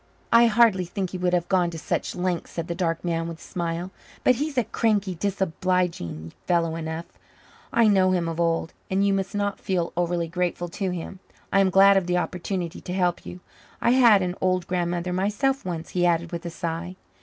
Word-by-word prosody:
"I 235 0 +7
hardly 220 -5 +4
think 185 0 -4
he 185 - -5
would 180 0 +1
have 175 -1 -1
gone 180 -2 +2
to 165 - -7
such 155 - -2
lengths," 180 -1 -2
said 170 -1 -4
the 170 - -2
dark 170 -1 -2
man 165 -1 -1
with 165 -1 -6
a - - -20
smile. 170 +1 -4 0.3
"But 255 - +5
he's 295 0 -3
a 245 - +4
cranky, 205 -3 0
disobliging 180 - -1 0.2
fellow 170 -2 +1
enough 160 0 -4 0.7
I 230 -1 +4
know 190 -3 +4
him 180 -2 +1
of 165 0 -4
old. 165 -1 0 0.2
And 195 +1 +2
you 200 - +3
must 195 +1 -2
not 205 -1 -1
feel 175 -3 -1
overly 175 -1 0
grateful 175 0 -2
to 190 +2 -3
me. 180 -2 -4 0.5
I 195 - +5
am 195 -1 +4
glad 195 +1 +6
of 185 -2 0
the 180 0 +1
opportunity 180 -1 -3
to 180 - -6
help 180 -2 0
you. 180 - -8 0.4
I 235 - +3
had 235 -6 +6
an 180 -1 -1
old 185 -1 +1
grandmother 175 0 -1
myself 210 +9 0
once," 170 -3 -4
he 180 - 0
added 170 -1 +1
with 170 0 -5
a - - -3
sigh. 170 +2 -4
180 Hz, 205 wpm, -25 LUFS, 170-195 Hz, 0.7 s, I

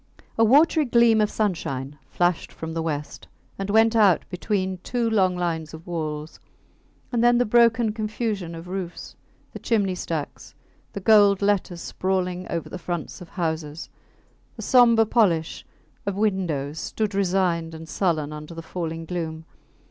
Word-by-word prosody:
A 225 - +3
watery 300 +6 +5
gleam 235 -3 +4
of 210 - +2
sunshine 145 -9 -2
flashed 175 -1 0
from 160 0 -7
the 165 - -2
west 150 -2 -4 0.3
and 195 0 -3
went 225 +2 +4
out 200 -7 +4
between 185 0 -2
two 240 +5 -1
long 190 -5 +2
lines 160 -3 -3
of 160 - -13
walls; 155 -3 -5 0.7
and 235 -2 +1
then 240 0 +5
the 245 - +3
broken 230 0 +3
confusion 215 -5 -3
of 165 +1 -9
roofs, 185 -1 -6 0.4
the - - -7
chimney 205 -5 +1
stacks, 165 -4 -5 0.4
the - - -4
gold 205 -1 +5
letters 190 -4 0
sprawling 185 -1 -2
over 170 -1 -3
the 185 - -7
fronts 175 +1 -5
of 175 - -10
houses, 160 -3 -4 0.7
the - - -7
sombre 235 -3 +5
polish 180 -8 +1 0.4
of 200 - -1
windows, 175 -8 -1
stood 215 +4 -2
resigned 180 -4 0
and 160 0 -9
sullen 160 -5 -1
under 150 +2 -9
the 165 - -7
falling 165 -1 -5
gloom. 160 -2 -5
185 Hz, 150 wpm, -24 LUFS, 165-215 Hz, 0.7 s, watery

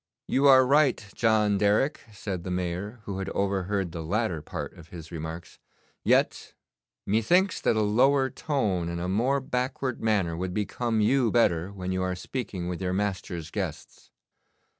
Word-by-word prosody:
'You 140 +2 +3
are 130 -1 +8
right, 140 -4 +3
John 105 -3 +2
Derrick,' 105 +9 +2
said 95 -3 -5
the 90 - -5
Mayor, 90 +5 -3
who 100 -2 -5
had 95 0 -3
overheard 100 -1 -1
the 85 -1 -5
latter 90 0 -1
part - - -6
of 85 -2 -14
his 80 -2 -10
remarks. 80 +1 -7 0.4
'Yet - - +1 0.5
methinks 170 - +2
that - - +2
a 110 - +2
lower 130 +6 +3
tone 100 - -1
and 85 0 -3
a 90 - -3
more 120 +9 +1
backward 130 0 -2
manner 100 -7 +1
would 90 +1 -4
become 110 +2 -1
you 125 +2 +3
better 90 -6 +2
when 95 -2 -5
you 95 0 -1
are 95 0 -1
speaking 95 -3 -5
with 90 0 -4
your 90 -1 -1
master's 95 -5 -3
guests. - - -6
100 Hz, 160 wpm, -27 LUFS, 90-120 Hz, 0.5 s, are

